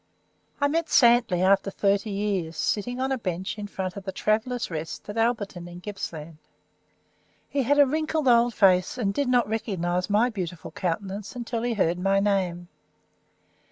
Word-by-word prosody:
I 285 - +3
met 330 +3 0
Santley 235 -7 +4
after 195 +1 +3
thirty 200 +1 0
years, 195 -5 -2
sitting 245 +4 -1
on 265 +1 -1
a 265 - 0
bench 185 +1 -4
in 205 - -5
front 190 -2 -4
of 200 - -7
the 190 - -4
"Travellers' 225 +3 -1
Rest" 160 0 -6
at 205 - -6
Alberton, 210 -6 -1
in 175 0 -10
Gippsland. 165 -5 -7 1.1
He 280 - -1
had 280 +3 +2
a 290 - +7
wrinkled 310 +1 -1
old 235 -1 +4
face, 185 +1 +3
and 200 -5 0
did 285 +3 0
not 245 -1 +3
recognise 185 -4 -2
my 220 +5 +3
beautiful 180 -5 -6
countenance 195 +4 -4
until 235 -1 -3
he 240 -1 -1
heard 175 -3 +1
my 195 +1 +2
name. 185 -4 0
205 Hz, 165 wpm, -26 LUFS, 185-240 Hz, 1.1 s, a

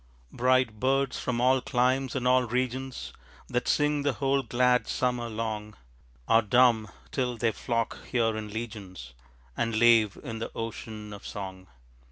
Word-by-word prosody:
Bright 125 -3 +2
birds 135 +1 +1
from 120 -2 -2
all 130 +1 +4
climes 130 +1 +1
and 125 -1 0
all 130 0 +5
regions 130 +2 -3 0.3
That 125 - -1
sing 150 0 +2
the 140 -1 +1
whole 135 0 +1
glad 125 0 +2
summer 125 -2 -1
long, 110 -1 -4 0.5
Are 115 - +5
dumb, 115 0 +4 0.2
till 125 -3 -1
they 115 -1 +1
flock 115 +1 -2
here 115 -3 +1
in 110 -1 -4
legions 100 - -7 0.4
And 115 -1 -1
lave 115 -3 +5
in 115 -5 -5
the 115 - -4
ocean 110 -2 -6
of 100 - -10
song. 95 -2 -7
120 Hz, 150 wpm, -28 LUFS, 110-130 Hz, 0.5 s, all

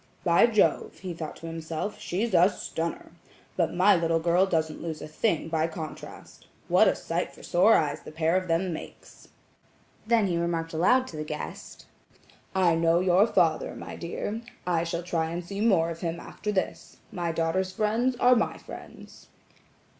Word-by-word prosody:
"By 170 +5 +5
Jove," 215 -3 +1
he 185 -2 -6
thought 160 -2 -6
to - - -11
himself, 165 +4 -5
"she's 205 +5 -2
a 180 +2 +6
stunner! 165 -4 -5 0.4
But 170 -3 0
my 190 +3 +5
little 165 -1 +1
girl 175 +3 +3
doesn't 160 -3 -1
lose 160 -2 -5
a - - -7
thing 160 +1 0
by 160 0 0
contrast. 160 -1 -9 0.2
What - - +5
a - - +3
sight - - -3
for - - -15
sore 195 +6 +4
eyes 150 -3 0
the - - -10
pair 160 +2 +1
of 185 0 0
them 170 +2 0
makes!" - - -11 0.8
Then 230 -2 +4
he 175 -3 0
remarked 165 -1 -2
aloud 250 +11 +3
to 155 - -8
the 155 - -3
guest: 150 0 -7 0.7
"I 180 -3 +4
know 165 +1 +3
your 185 +3 +4
father, 165 -7 +1
my - - -8
dear; 205 +6 -4 0.2
I 170 -2 +1
shall 170 +1 -3
try 165 -2 -1
and 170 +1 -5
see 200 +3 -5
more 180 -7 +3
of 165 - -7
him 170 -1 -3
after 210 +4 -5
this. 190 -2 -3
My 175 -2 -2
daughter's 165 +3 0
friends 225 +5 0
are 250 +1 +5
my 235 - 0
friends." - - -12
170 Hz, 175 wpm, -27 LUFS, 165-190 Hz, 0.8 s, a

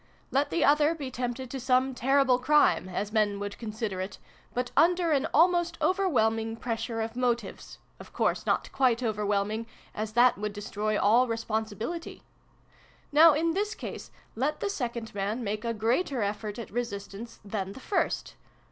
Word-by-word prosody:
Let 275 +2 +2
the - - +2
other 300 +2 +4
be 280 -5 -6
tempted 250 0 -4
to 270 - -4
some 255 +1 +2
terrible 260 0 +3
crime 295 -8 +3
as 200 +3 -3
men 210 -2 +1
would 205 0 -5
consider 215 -4 -4
it 190 +2 -6 0.3
but 250 0 -2
under 340 +2 +4
an 285 +1 +2
almost 345 +1 +3
overwhelming 225 - +1
pressure 230 -1 -3
of 225 +1 -4
motives 240 -4 -2 0.2
of - - -12
course - - 0
not - - 0
quite 255 -2 +2
overwhelming, 210 0 -1 0.3
as 215 0 -4
that 240 -2 +4
would 210 0 -3
destroy 210 +1 -2
all 235 +5 +4
responsibility. 225 +7 -4 0.9
Now, 310 +2 +8
in 330 +2 +1
this 410 +3 -1
case, - - -7 0.3
let 270 +7 -1
the 405 - -1
second 235 - -4
man 205 +4 -2
make 210 0 -3
a 235 - -1
greater 235 - 0
effort 205 +1 -3
at 235 - -7
resistance 220 -1 -5
than 195 -1 -3
the - - -10
first. 395 - -1
235 Hz, 160 wpm, -28 LUFS, 215-275 Hz, 0.9 s, Now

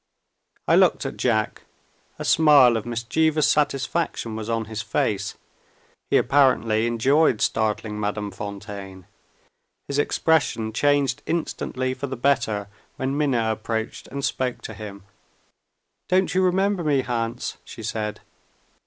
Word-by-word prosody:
I - - +5
looked - - +4
at - - -4
Jack. 110 -4 0 0.6
A - - -5
smile 145 -6 +6
of 115 +1 -3
mischievous 150 +7 +1
satisfaction 145 -4 0
was 110 0 -5
on 115 -1 -1
his 110 0 -5
face. 105 -2 -1 0.7
He - - +4
apparently 120 -5 +3
enjoyed 125 +2 +3
startling 105 -1 -1
Madame 105 0 -2
Fontaine. 100 -1 -8 0.8
His 140 0 -1
expression 140 -8 +1
changed 145 +1 +2
instantly 130 -6 -2
for 130 +2 -5
the 135 -1 -5
better, 120 -6 +1 0.3
when 135 +1 -2
Minna 125 -7 +1
approached 110 +1 -4
and 140 0 -3
spoke 125 -2 -2
to 110 - -6
him. 100 -2 -9 1.1
"Don't 185 +1 +2
you 185 - +3
remember 190 0 +1
me, 145 -3 +2
Hans?" 115 -2 -3
she 110 - -10
said. 105 -1 -3
120 Hz, 125 wpm, -24 LUFS, 110-145 Hz, 1.1 s, smile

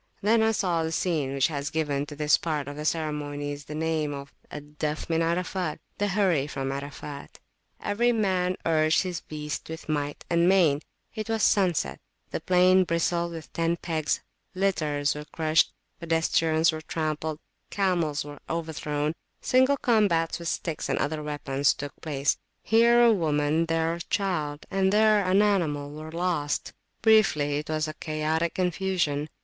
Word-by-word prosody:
Then 220 +2 +4
I 220 0 +3
saw 180 -6 0
the 160 0 -2
scene 160 -5 0
which 135 -1 +2
has 145 -2 -3
given 145 -3 -1
to 145 - -8
this 150 0 +4
part 150 -4 -2
of 145 - -6
the 150 +1 -6
ceremonies 145 -2 -2
the 150 - -7
name 155 -2 -1
of 140 0 -9 0.2
Al 150 - -6
Dafa 150 +1 -4
min 165 0 +2
Arafat, 175 0 -1 0.2
the 205 - +1
Hurry 185 -8 +2
from 135 -2 -3
Arafat. 140 +1 -7 0.4
Every 235 +4 +1
man 185 -5 +1
urged 155 0 +3
his 180 -2 -4
beast 150 0 -6
with 160 0 -7
might 145 -2 -2
and 170 +1 +3
main: 165 -7 +4 0.3
it 215 -1 -5
was 225 -1 0
sunset; 185 -6 +2 0.3
the - - -2
plain 185 +1 +4
bristled 170 0 0
with 160 -2 -9
tent 165 +1 -1
pegs, 160 -3 -1 0.3
litters 155 -7 +1
were 150 0 -7
crushed, 155 0 +2 0.3
pedestrians 165 0 +2
were 155 0 -5
trampled, 155 -1 -3 0.3
camels 175 -7 0
were 145 0 -9
overthrown: 155 -2 -2 0.3
single 260 +2 +3
combats 190 -10 +2
with 170 - -5
sticks 165 -1 -3
and - - +1
other 150 +1 -1
weapons 145 -2 0
took 145 0 -6
place; 145 -2 0 0.2
here 235 +2 +5
a 235 -1 +6
woman, 155 -2 +1
there 165 0 +1
a 170 - -5
child, 155 -7 -2
and 190 0 +2
there 215 0 +4
an 190 +2 +4
animal 155 -8 0
were 155 +1 -8
lost; 170 -4 -1 0.3
briefly, 155 -10 +4
it 150 - -8
was 155 0 0
a 155 - -5
chaotic 155 +2 -1
confusion. 180 -5 0
160 Hz, 160 wpm, -27 LUFS, 150-185 Hz, 0.4 s, a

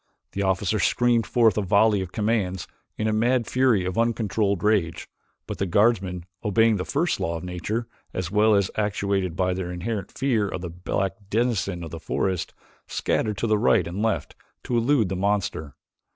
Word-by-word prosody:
The 100 - -3
officer 95 +2 +1
screamed 120 0 +2
forth 115 -4 +3
a - - +1
volley 100 +1 +3
of 90 -2 -6
commands 105 -5 -1 0.3
in 110 - -1
a 110 - +1
mad 120 +2 +2
fury 125 -7 +2
of 90 +3 -2
uncontrolled 110 -4 0
rage 100 -7 +1 0.4
but - - -6
the 100 - 0
guardsmen, 95 -3 +2 0.2
obeying 110 +1 +3
the 90 - -3
first 160 +4 0
law 85 0 -1
of 80 - -8
nature 90 +6 -3 0.3
as 90 -2 -4
well 105 +1 +4
as 100 -2 +1
actuated 100 -4 -1
by 90 0 +1
their 90 -1 -4
inherent 95 +3 -4
fear 120 -7 0
of 90 - -5
the 90 -2 -5
black 95 +2 -2
denizen 105 -6 0
of 80 - -7
the 85 - -6
forest 95 +2 -2 0.4
scattered 105 -2 -1
to 115 - -1
right 105 +4 +3
and 90 +4 -4
left 110 -2 -1 0.3
to 125 - -2
elude 120 -1 +3
the 95 - -2
monster. 95 -6 -1
100 Hz, 180 wpm, -24 LUFS, 90-110 Hz, 0.4 s, well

